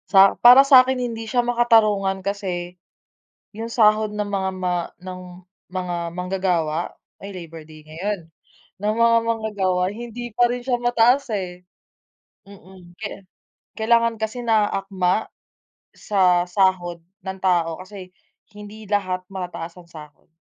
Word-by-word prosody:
Sa 195 0 +7
para 250 +3 +9
sa 270 -2 +9
'kin, 260 0 -1
hindi 230 -2 -4
siya 245 0 +1
makatarungan 215 -5 +2
kasi 180 -3 -4 0.8
'yung 225 +1 -5
sahod 215 -2 +3
ng 210 -1 -3
mga 195 -1 -1
ma 180 -1 -1 0.3
ng 185 0 -7 0.5
mga 180 -2 -3 0.2
manggagawa 180 -3 -1 0.2
ay 200 0 -9
Labor 165 -3 -9
Day 155 -1 -14
ngayon, 175 +6 -4 0.6
ng 210 +2 -1
mga 230 0 +4
manggagawa, 200 -5 0
hindi 240 +2 -7
pa 240 +2 +3
rin 245 +1 -3
siya 245 -1 0
mataas 240 +3 +3
eh, 180 -2 -5 0.8
mm. 185 -3 -16
Kaya 205 0 -6 0.6
kailangan 230 +1 +2
kasi 235 +3 -4
naaakma 195 -3 +1 0.7
sa 185 -4 +2
sahod 180 -3 +1 0.2
ng 190 0 -6
tao, 170 -3 +1
kasi 185 0 -10 0.5
hindi 210 +1 -10
lahat 185 -3 0
mataas 180 -2 -7
ang 175 - -15
sahod. 150 -3 -14
195 Hz, 130 wpm, -22 LUFS, 180-225 Hz, 0.8 s, para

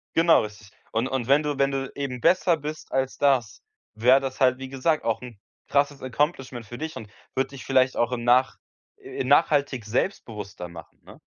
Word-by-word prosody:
Genau, 165 0 +5
richtig. 105 0 -10 0.2
Und 115 +3 0
und 130 -3 -2
wenn 140 +2 +5
du 145 -2 -2
wenn 140 0 +2
du 135 0 -3
eben 130 -4 -4
besser 175 -2 +3
bist 155 +1 -7
als 130 0 -1
das, 135 -7 +1 0.3
wäre 125 +5 +5
das 135 0 -5
halt, 130 -1 +4
wie 130 0 -7
gesagt, 150 +4 0
auch 115 0 0
'n 120 -5 -10 0.3
krasses 140 0 +1
Accomplishment 130 -3 -2
für 120 +4 -9
dich 160 +2 -5
und 110 - -8 0.3
würd 135 +1 0
dich 135 - -10
vielleicht 130 -1 +2
auch 120 +1 +1
im 120 -1 -3
nach 125 +2 +3 0.4
äh, 400 0 -6
nachhaltig 140 -6 +2
selbstbewusster 105 - -3
machen, 85 -1 -13
ne? - - -15
130 Hz, 190 wpm, -25 LUFS, 120-145 Hz, 0.4 s, Genau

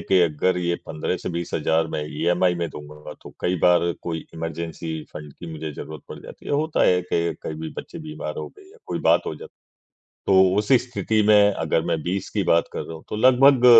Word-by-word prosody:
कि 95 -1 +3
अगर 85 +3 +1
ये 85 -1 0
15 80 +3 -2
से - - -5
20,000 80 -1 0
मैं 75 - -2
इएमआई 90 +4 +1
में 85 -1 -2
दूँगा 75 +1 -10
तो - - -12
कई 90 0 0
बार 85 -1 +4
कोई 80 -2 -4
इमरजेंसी 80 -1 -4
फंड 75 -1 -8
की 85 -2 -9
मुझे 80 -1 -5
ज़रूरत 75 +1 -8
पड़ - - -8
जाती - - -12
है। - - -2
होता 155 +2 +1
है 90 0 +4
कि 85 0 +1
कभी 80 0 -5
बच्चे 170 - -8
बीमार 155 0 -6
हो - - -5
गए 390 -2 -18
या 450 - -19
कोई - - -2
बात - - +3
हो - - -3
जाती 460 - -12 0.7
तो - - +4 0.2
उसी 105 +5 +5
स्थिति 115 -3 0
में 105 -1 +6
अगर 80 -3 0
मैं 80 -2 0
20 95 +2 -2
की 100 -2 -1
बात 85 - +5
कर - - -3
रहा 80 - -7
हूँ 80 - -12
तो - - -3
लगभग 130 +3 +6
85 Hz, 215 wpm, -23 LUFS, 80-105 Hz, 0.7 s, में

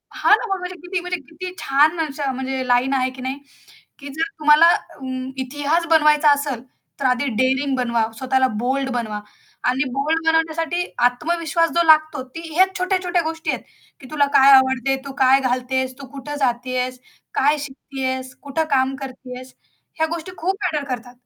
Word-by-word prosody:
हां - - +5
ना. - - -6
मग 385 -1 -1
म्हणजे 360 0 -6
किती 360 0 -2
म्हणजे 360 0 -4
किती 360 +3 -7
छान 300 +5 +3
असे 290 -3 -2
म्हणजे 265 0 -3
लाईन 250 +2 +2
आहे 260 -1 +1
की 260 - -9
नाही? 260 +2 -3 0.6
की 280 - -9
जर 325 +7 -1
तुम्हाला 300 +2 +6
अं, 260 -5 -6
इतिहास 290 +6 -1
बनवायचा 300 -2 +5
असेल 280 -4 -1 0.4
तर 275 - -2
आधी 255 +2 +2
डेअरिंग 265 +3 +1
बनवा, 235 -3 0
स्वतःला 260 0 +2 0.2
बोल्ड 265 +2 0
बनवा 215 -3 -3 0.5
आणि 260 +3 +1
बोल्ड 290 +5 0
बनवण्यासाठी 325 +2 +1 0.2
आत्मविश्वास 330 +5 0
जो 340 - +4
लागतो 310 -3 +4
ती 330 - -5
ह्याच 375 +3 +3
छोट्या-छोट्या 365 -1 0
गोष्टी 320 0 -4
आहेत. - - -4 0.4
की 260 - -12
तुला 290 -2 +3
काय 275 +1 +7
आवडते? 265 0 +4
तू 275 - -7
काय 265 +1 +5
घालतेस? 255 0 -1
तू 275 - -9
कुठं 280 +1 -7
जातीयेस? 255 0 -1 0.3
काय 290 +3 +3
शिकतीयेस? 260 -2 -5
कुठं 285 +3 -1
काम 265 0 +2
करतीयेस? 255 -1 -9 0.5
ह्या 320 - +2
गोष्टी 335 +2 -5
खूप 380 +3 -1
मॅटर 305 -5 -1
करतात. 245 0 -5
275 Hz, 165 wpm, -21 LUFS, 260-320 Hz, 0.6 s, काय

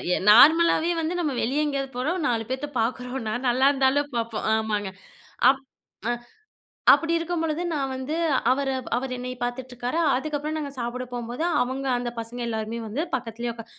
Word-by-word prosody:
எ - - 0
நார்மலாவே 325 +7 +6
வந்து 320 +2 -1
நம்ம 310 -5 0
வெளிய 275 +6 +1
எங்கயாது 275 -2 -2
போறோம், 305 +9 -1
4 230 -2 0
பேத்த 260 +2 -2
பாக்குறோம்னா, 250 -1 -2
நல்லாருந்தாலும் 270 +2 +3
பாப்போம், 230 -1 -2
ஆமாங்க. 210 -2 -1 0.6
அப் 270 0 +4 0.5
அ - - +2 0.8
அப்டி 330 0 +1
இருக்கும்பொழுது, 330 -1 -2
நான் 270 -3 -1
வந்து 260 +4 -3 0.4
அவர 275 +1 0 0.3
அவர் 260 0 -3
என்னைய 250 0 -5
பாத்துட்டு 250 +1 -4
இருக்காரா? 245 +7 -2 0.2
அதுக்கப்புறம் 305 +2 -3
நாங்க 285 -2 -4
சாப்ட 245 +2 -3
போம்போது 240 +5 -4 0.2
அவங்க 265 +2 -4
அந்த 245 0 -2
பசங்க 235 +2 -6
எல்லாருமே 220 +1 -3
வந்து 270 +10 -2
பக்கத்திலயே 235 -1 -4
உக்கா 230 -1 -10
260 Hz, 150 wpm, -25 LUFS, 240-290 Hz, 0.8 s, நார்மலாவே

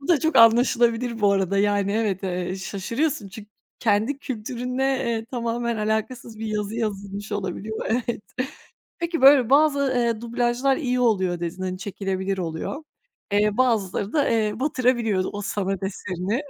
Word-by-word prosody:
Bu 275 - -10
da 330 -6 +4
çok 320 0 +1
anlaşılabilir 235 0 +4
bu 200 -1 +4
arada. 195 0 +1
Yani, 200 -1 +2
evet, 210 -3 0
eee, 180 0 -2
şaşırıyorsun 210 +6 -2
çünkü 210 +2 -11 0.3
kendi 220 +5 +1
kültürünle, 250 0 -4 0.2
eee, 230 -3 -2
tamamen 235 -1 -2
alakasız 220 +2 -2
bir 225 - -4
yazı 210 0 -2
yazılmış 205 -2 -4
olabiliyor, 205 +2 -4
evet. 235 -1 -1 0.8
Peki 340 -2 -2
böyle 270 -3 +7
bazı, 280 -1 +4
eee, 235 -2 +1
dublajlar 240 +3 +1
iyi 250 -5 -1
oluyor 190 -7 +1
dedin, 175 +2 -4
hani, 185 0 -3
çekilebilir 195 -1 -3
oluyor. 170 - -4 0.5
Eee, 210 0 +2
bazıları 215 -5 +1
da, 290 -3 +2
eee, 220 -2 +1
batırabiliyor 240 -9 +1
o 205 - -5
sanat 195 -1 -2
eserini. 190 - -3
220 Hz, 145 wpm, -24 LUFS, 200-245 Hz, 0.8 s, böyle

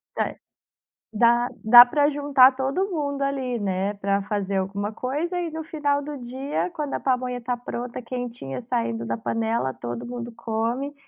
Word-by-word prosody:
Ta - - -1 0.8
dá 240 +2 +3 0.2
dá 240 +2 +10
pra 290 +3 +2
juntar 280 -2 +5
todo 275 +10 -1
mundo 285 -4 -2
ali, 265 -3 -1
né, 195 0 -1
pra 200 0 0
fazer 200 -1 -2
alguma 200 +2 -2
coisa, 310 +10 -2
e 335 -2 -3
no 320 0 -5
final 290 -3 0
do 290 -1 -6
dia, 265 +8 -3
quando 300 -3 -4
a - - -2
pamonha 250 -1 -1
tá 245 +1 -2
pronta, 245 0 -6
quentinha, 235 - -5
saindo 115 -1 -2
da 115 0 -1
panela, 225 - -1
todo 120 -1 -6
mundo 240 -1 -6
come, 235 +6 -2
245 Hz, 160 wpm, -24 LUFS, 210-280 Hz, 0.8 s, dá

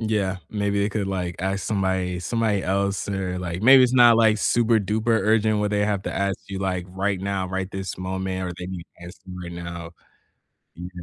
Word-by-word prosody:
Yeah, 105 -4 -1
maybe 100 -1 0
they 100 - +1
could, 105 -2 -2
like, 90 -3 -3
ask 95 +2 -1
somebody 95 -3 -1
somebody 105 +1 0
else 100 +1 -1
or, 95 -2 -2
like, 90 +1 -4
maybe 130 +2 +8
it's 125 - 0
not, 120 -2 +7
like, 110 -2 +4
super 115 0 +3
duper 110 +3 +1
urgent 110 0 +2
where 105 - +1
they 105 0 +1
have 105 -2 -1
to - - -4
ask 100 -1 -1
you, 100 -1 -4
like, 95 -2 -2
right 95 +1 -2
now, 95 -1 -2
right 95 0 -3
this 95 -1 -5
moment, 95 0 -3
or 90 - -4
they 90 - -5
need 90 -2 -6 0.2
to 85 - -9
ask 90 - -12
you 90 -1 -8
right 85 -1 -7
now, 85 -1 -7 0.9
mhm. 90 +1 -7
95 Hz, 210 wpm, -24 LUFS, 90-105 Hz, 0.9 s, maybe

